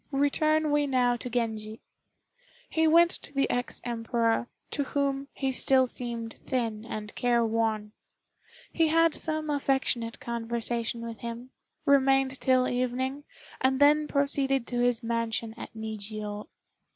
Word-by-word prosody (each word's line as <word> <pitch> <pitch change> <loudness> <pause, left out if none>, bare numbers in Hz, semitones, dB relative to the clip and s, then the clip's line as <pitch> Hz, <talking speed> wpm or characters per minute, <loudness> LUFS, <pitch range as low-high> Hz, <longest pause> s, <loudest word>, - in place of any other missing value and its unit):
Return 305 +2 +2
we 290 0 +2
now 250 -2 +2
to 250 - -6
Genji. 220 -2 -2 0.9
He 320 0 +2
went 340 +2 +6
to - - -3
the 275 - +2
ex 245 0 -2
Emperor, 230 0 0 0.2
to 285 - 0
whom 275 0 -1
he 270 -1 -2
still 260 0 +4
seemed 235 -2 -5
thin 225 -4 -2
and 210 -2 -6
careworn. 225 -3 +1 0.8
He 325 -1 +3
had 330 0 +4
some 310 -1 -2
affectionate 265 -5 0
conversation 235 0 -3
with 230 -1 -7
him, 235 +2 -7 0.3
remained 270 -2 +3
till 255 -1 +3
evening, 255 +3 -2 0.4
and 265 0 +2
then 300 +1 +5
proceeded 275 -3 +1
to 245 0 -3
his 245 -1 +1
mansion 230 -1 -2
at - - -8
Nijiô. 215 0 -5
245 Hz, 130 wpm, -28 LUFS, 230-275 Hz, 0.9 s, went